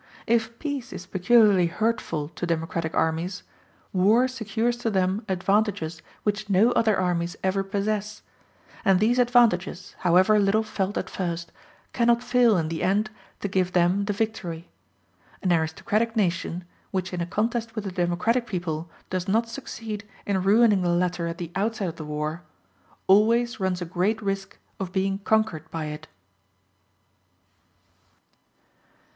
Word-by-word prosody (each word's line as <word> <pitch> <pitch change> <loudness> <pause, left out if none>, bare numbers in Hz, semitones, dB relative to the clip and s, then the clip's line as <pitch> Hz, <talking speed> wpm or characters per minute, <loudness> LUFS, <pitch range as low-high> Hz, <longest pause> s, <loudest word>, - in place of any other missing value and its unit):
If 230 0 +1
peace 285 -4 -4
is 180 - -7
peculiarly 190 -1 +4
hurtful 170 -7 -1
to 175 +1 -5
democratic 165 0 -2
armies, 165 +4 -1 0.5
war 210 +7 +4
secures 235 -1 -1
to 240 -1 -1
them 190 +1 0
advantages 190 -3 0 0.2
which 210 0 -1
no 200 +5 +4
other 220 -4 +3
armies 175 -1 0
ever 190 +1 +1
possess; 210 +1 -2 0.6
and 195 -2 +4
these 235 +4 +3
advantages, 225 -7 +2
however 185 +4 +4
little 205 +2 +3
felt 205 -2 -2
at - - -2
first, 170 -2 -4 0.4
cannot 235 0 +3
fail 245 -5 +4
in 160 -2 -1
the 165 -1 -3
end 205 +4 +1 0.3
to - - -1
give 185 -2 0
them 180 +3 +3
the 205 - -1
victory. 195 -6 -3 0.8
An 180 -2 +3
aristocratic 205 +8 0
nation, 180 -3 0 0.3
which 190 -1 -3
in 175 - -2
a 170 - -2
contest 225 +4 -1
with 215 -2 -4
a 195 - -3
democratic 180 +8 0
people 170 -4 -3 0.2
does 185 -1 -2
not 225 +4 +2
succeed 225 -4 -6 0.2
in 195 -2 0
ruining 210 +1 +4
the 175 - +1
latter 175 0 0
at 165 0 -4
the 175 -2 -6
outset 210 0 -1
of 165 - -9
the 155 - -6
war, 150 +2 -3 0.6
always 230 +4 +4
runs 185 -2 -1
a - - -5
great 185 +6 0
risk 195 -2 -3 0.2
of 190 -2 -4
being 195 +1 0
conquered 205 -7 0
by 160 -2 -4
it. 150 0 -7
195 Hz, 145 wpm, -25 LUFS, 175-220 Hz, 0.8 s, peculiarly